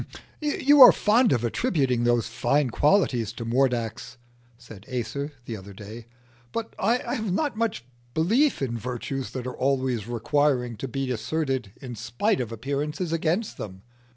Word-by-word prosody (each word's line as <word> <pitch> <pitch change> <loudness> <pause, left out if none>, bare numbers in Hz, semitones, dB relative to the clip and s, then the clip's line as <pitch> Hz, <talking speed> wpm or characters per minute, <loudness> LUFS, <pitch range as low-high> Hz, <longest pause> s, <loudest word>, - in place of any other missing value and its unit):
"You 290 -1 +4
are 250 - +12
fond 225 +2 +3
of 120 - +1
attributing 130 - +1
those 120 -1 +2
fine 130 +4 0
qualities 140 - +2
to 115 0 -6
Mordax," 120 -1 -1 0.4
said 110 -5 -13
Acer, 130 +4 -3
the 115 - -5
other 100 0 -10
day, 110 +3 -10 0.4
"but 230 -1 -4
I 230 +5 +3 0.2
have 220 -4 -2
not 290 - 0
much 220 - -2 0.3
belief 225 - +2
in 120 -3 -2
virtues 125 +3 -4
that 130 -2 -5
are 125 - -5
always 130 -5 0
requiring 125 +1 +1
to 135 - -4
be 135 +1 -3
asserted 130 -3 -2
in 125 -2 -6
spite 120 - -1
of 115 -2 -5
appearances 145 - -3
against 170 +6 -1
them. 95 -2 -7
130 Hz, 155 wpm, -25 LUFS, 120-165 Hz, 0.4 s, are